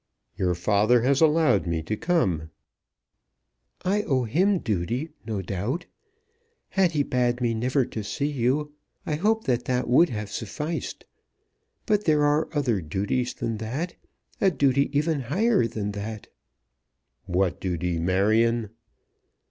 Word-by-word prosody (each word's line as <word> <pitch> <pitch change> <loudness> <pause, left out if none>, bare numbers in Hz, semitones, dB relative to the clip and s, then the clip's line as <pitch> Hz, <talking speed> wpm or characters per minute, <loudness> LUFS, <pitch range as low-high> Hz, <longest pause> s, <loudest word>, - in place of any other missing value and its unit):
"Your 90 -1 0
father 105 +6 +3
has 135 +3 +2
allowed 155 - +4
me 80 -1 -1
to 110 - -2
come." 100 - 0 1.4
"I 200 +3 +2
owe 135 -10 0
him 185 - +2
duty, 115 - -2 0.2
no 105 -4 -2
doubt. 105 - -3 0.8
Had 185 -3 +2
he 145 -2 +2
bade 125 -2 0
me 120 -2 +1
never 125 +4 +1
to 110 - -6
see 140 +7 -2
you, 145 +3 0 0.3
I - - -2
hope 215 +8 +1
that 120 -1 0
that 125 0 0
would 150 +8 +5
have 105 -2 -5
sufficed. 150 - -4 0.8
But 210 -2 +1
there 150 -2 +3
are 145 +2 +2
other 125 - 0
duties 100 +10 -2
than 115 -1 -3
that, 130 +11 -4 0.5
a 195 - +5
duty 140 -3 +2
even 155 0 +1
higher 190 - +2
than 105 -3 -3
that." 105 +1 -6 1.0
"What 90 0 0
duty, 90 -2 -1
Marion?" 110 +5 +2
125 Hz, 135 wpm, -25 LUFS, 105-150 Hz, 1.4 s, would